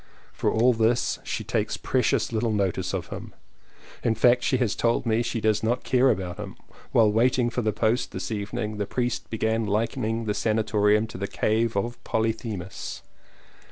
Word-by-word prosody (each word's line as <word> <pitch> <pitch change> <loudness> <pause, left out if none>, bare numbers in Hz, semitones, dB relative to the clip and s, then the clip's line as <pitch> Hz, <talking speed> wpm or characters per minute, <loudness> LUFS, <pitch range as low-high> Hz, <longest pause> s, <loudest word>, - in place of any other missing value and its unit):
For - - 0
all 120 +3 +4
this 115 +1 +1
she - - -3
takes - - -1
precious - - +1
little 115 +1 +1
notice 95 -3 0
of 90 -3 -4
him - - -8 0.3
— - - -22
in 115 - +2
fact 120 +2 +4
she 130 - +1
has 120 -5 +1
told 115 +1 +1
me 115 0 +2
she 115 0 -2
does 110 -1 +2
not 120 +3 0
care 130 +1 +3
about 90 -3 -1
him. 105 -2 -7 0.4
While 110 -2 +5
waiting 120 +2 +2
for 125 - -1
the 110 -2 +1
post 110 +3 0
this 95 +1 -5
evening 105 +1 -3
the 105 -1 -2
priest 125 -2 -2
began 110 0 0
likening 115 +2 -1
the 105 - 0
sanatorium 105 0 +2
to 110 - -9
the 100 - -2
cave 110 +1 0
of 120 +4 -3
Polythemus. 110 -4 -3
110 Hz, 180 wpm, -26 LUFS, 105-120 Hz, 0.4 s, While